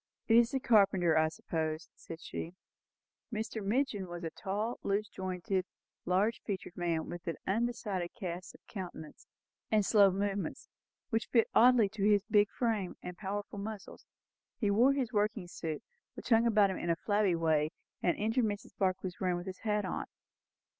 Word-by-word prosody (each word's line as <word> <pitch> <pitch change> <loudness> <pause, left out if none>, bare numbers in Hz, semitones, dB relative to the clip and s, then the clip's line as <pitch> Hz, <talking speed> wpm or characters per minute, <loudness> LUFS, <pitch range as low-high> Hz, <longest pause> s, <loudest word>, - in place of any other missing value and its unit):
"It 225 - +5
is 235 0 +6
the 270 - -1
carpenter, 195 -8 +4
I 160 0 +4
suppose," 160 0 -3
said 165 0 -10
she. 170 +2 -6 0.8
Mr. 220 -1 -3
Midgin 215 -2 0
was 175 0 -7
a 165 - -3
tall, 210 +5 -3
loose 205 +2 0
jointed, 185 0 -2 0.4
large 200 +6 +1
featured 190 -4 -5
man, 170 -2 -1
with 175 +1 -7
an 165 - -2
undecided 205 -4 -1
cast 180 -4 -6
of - - -20
countenance, 180 -6 -8 0.4
and 215 -2 +3
slow 200 -2 +6
movements; 200 +1 -2 0.4
which 225 0 0
fitted 230 -2 +3
oddly 245 -3 +6
to 205 -1 -4
his 205 -1 +4
big 205 -1 +4
frame 220 -6 -1
and 180 0 -6
powerful 205 +1 -4
muscles. 210 0 -7 0.5
He 210 -5 +1
wore 245 +7 +5
his 265 -5 -2
working 210 -2 0
suit, 165 +2 -5 0.3
which - - -8
hung 230 0 +5
about 210 -3 +4
him 185 - -4
in 170 - -3
a 170 - +3
flabby 205 0 +1
way, 160 -2 +2 0.3
and 175 - +2
entered 225 +3 +1
Mrs. 205 -1 -4
Barclay's 185 -1 -1
room 180 -2 +1
with 175 - -6
his 185 -1 -6
hat 210 -2 0
on. - - -3
200 Hz, 170 wpm, -32 LUFS, 180-220 Hz, 0.8 s, is